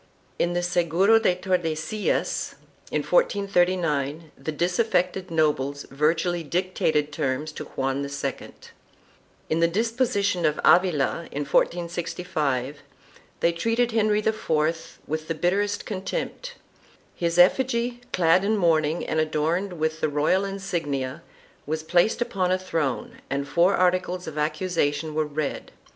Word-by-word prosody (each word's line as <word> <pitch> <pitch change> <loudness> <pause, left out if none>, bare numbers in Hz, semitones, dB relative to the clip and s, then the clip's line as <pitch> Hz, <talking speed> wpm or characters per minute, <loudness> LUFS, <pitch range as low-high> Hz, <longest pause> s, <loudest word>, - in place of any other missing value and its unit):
In 175 - +1
the 175 0 0
Seguro 175 +5 +3
de 185 -5 +2
Tordesillas, 180 +2 -1 0.3
in - - -1
1439, 175 - +1
the 155 - -5
dis 175 +5 -1
affected 185 -4 +1
nobles 145 -3 0
virtually 165 +5 +1
dictated 160 -3 0
terms 150 0 -2
to - - -7
Juan 135 +1 -2
II.1 140 0 -4 1.0
In 160 - +2
the 170 - +4
Deposition 205 -2 0
of 150 -1 +1
Avila, 170 -2 +3
in 145 - -2
1465, 155 -5 -1 0.6
they 170 - +4
treated 230 +7 0
Henry 215 -1 +2
IV 165 -6 -1
with 155 +1 -4
the 165 - -2
bitterest 200 +5 0
contempt. 480 - -4 0.6
His 170 0 -1
effigy, 240 +5 +3
clad 175 +1 +3
in 215 +2 +1
mourning 160 -3 +2
and 155 - -1
adorned 160 +5 0
with 160 -1 -2
.the 155 - +2
royal 150 +6 +2
insignia, 165 -8 -3 0.5
was 155 +1 -2
placed 175 +8 +2
upon 185 -5 -1
a 185 - +3
throne 160 -8 -3
and 140 +1 -2
four 175 +5 +3
articles 180 0 +1
of 155 -1 -5
accusation 155 -1 -1
were 155 0 0
read. 150 -1 -4
170 Hz, 125 wpm, -25 LUFS, 155-185 Hz, 1.0 s, the